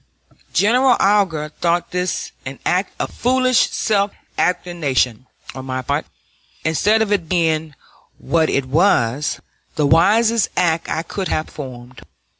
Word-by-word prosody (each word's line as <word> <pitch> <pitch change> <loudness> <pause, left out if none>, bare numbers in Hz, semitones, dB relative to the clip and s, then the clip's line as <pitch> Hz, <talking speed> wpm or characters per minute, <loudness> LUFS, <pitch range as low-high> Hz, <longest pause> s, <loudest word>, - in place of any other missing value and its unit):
General 245 +4 +3
Alger 190 -7 +2
thought 170 +2 -1
this 180 0 -2
an - - -7
act - - +1
of - - -3
foolish 255 0 +2
self 200 -2 0 0.2
abnegation 140 -10 0 0.3
on 130 0 -8
my 130 0 -3
part 145 +4 -2 0.6
instead 210 +8 +3
of 210 - -4
its 195 -5 +1
being, 160 -3 0 0.4
what 160 -1 +1
it 140 - 0
was, 145 - +1 0.4
the 150 - +1
wisest 215 +8 +3
act 165 -2 +1
I 160 - -2
could 190 +3 -4
have 155 - -1
performed. 125 -4 -10
165 Hz, 130 wpm, -19 LUFS, 145-200 Hz, 0.6 s, General